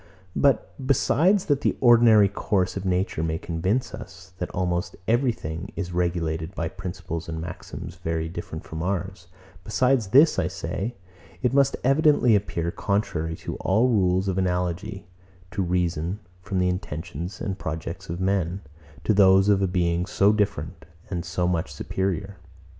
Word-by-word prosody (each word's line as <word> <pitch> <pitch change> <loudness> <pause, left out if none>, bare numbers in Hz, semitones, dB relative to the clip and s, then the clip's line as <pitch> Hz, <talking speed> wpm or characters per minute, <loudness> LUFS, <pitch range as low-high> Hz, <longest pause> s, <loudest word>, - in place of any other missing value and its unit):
But, 125 -10 +2
besides 160 - +3
that 145 -2 +1
the - - +1
ordinary 115 -4 +7
course 100 -1 0
of 95 -1 -4
nature 90 -3 0
may 80 0 -1
convince 95 +10 -1
us, 95 0 -10
that 90 - -3
almost 90 -1 -2
everything 110 - 0
is 90 -2 -4
regulated 85 -1 -1
by 80 -1 -2
principles 90 -3 -6
and 80 -1 -4
maxims 85 +1 -7
very 80 -2 -2
different 80 -1 -6
from 80 0 -6
ours; 95 0 -3 0.4
besides 125 0 +2
this, 145 +10 +5
I - - +1
say, 115 +6 -4 0.5
it 125 - +2
must 140 0 +3
evidently 135 -4 +4
appear 85 -4 -1
contrary 100 -6 -1
to - - -4
all 110 +7 +2
rules 95 -4 +2
of 95 0 0
analogy 90 +2 -2 0.5
to 105 - -2
reason, 90 0 0 0.2
from 95 +1 -3
the 90 0 +2
intentions 90 0 -4
and 95 -2 -3
projects 85 +4 -5
of 85 +1 -4
men, 95 -1 0 0.4
to 110 - +2
those 95 0 +6
of 100 -1 +4
a 95 - +2
Being 90 -1 0
so 100 +1 +3
different, 95 -5 -2 0.3
and 85 -2 -2
so 90 +1 -1
much 85 -2 -1
superior. 95 +1 -3
95 Hz, 155 wpm, -25 LUFS, 85-105 Hz, 0.5 s, ordinary